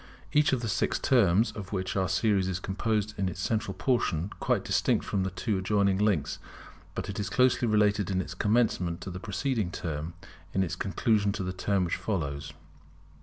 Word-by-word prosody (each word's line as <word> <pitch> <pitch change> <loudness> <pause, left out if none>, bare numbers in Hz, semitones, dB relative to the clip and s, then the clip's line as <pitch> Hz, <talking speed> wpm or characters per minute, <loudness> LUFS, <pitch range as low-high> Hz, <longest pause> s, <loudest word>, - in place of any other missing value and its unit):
Each 150 0 +4
of 130 -3 +1
the - - -1
six 100 - +1
terms 110 -3 +3
of 100 -3 -8
which 95 -2 -2
our 95 -1 +1
series 95 0 +2
is 95 -1 -2
composed 105 +2 -1
is - - -21
in 95 -1 +1
its 90 - -7
central 105 0 -1
portion 100 - 0
quite - - 0
distinct - - +1
from 100 - -1
the 95 - 0
two 100 +2 -1
adjoining 100 0 +2
links; 100 -9 +1 0.6
but - - -3
it 100 - -4
is 100 -2 -2
closely 125 +2 +3
related 105 -2 +2
in 95 -1 0
its 90 - -4
commencement 100 -4 +1
to 95 - -6
the 90 - -6
preceding 110 0 -1
term, 80 -1 -4 0.4
in 95 - +3
its 85 - -3
conclusion 100 +2 +1
to 100 - -3
the 90 0 -3
term 95 0 0
which 85 - -1
follows. 75 -7 -3
100 Hz, 195 wpm, -29 LUFS, 90-110 Hz, 0.6 s, Each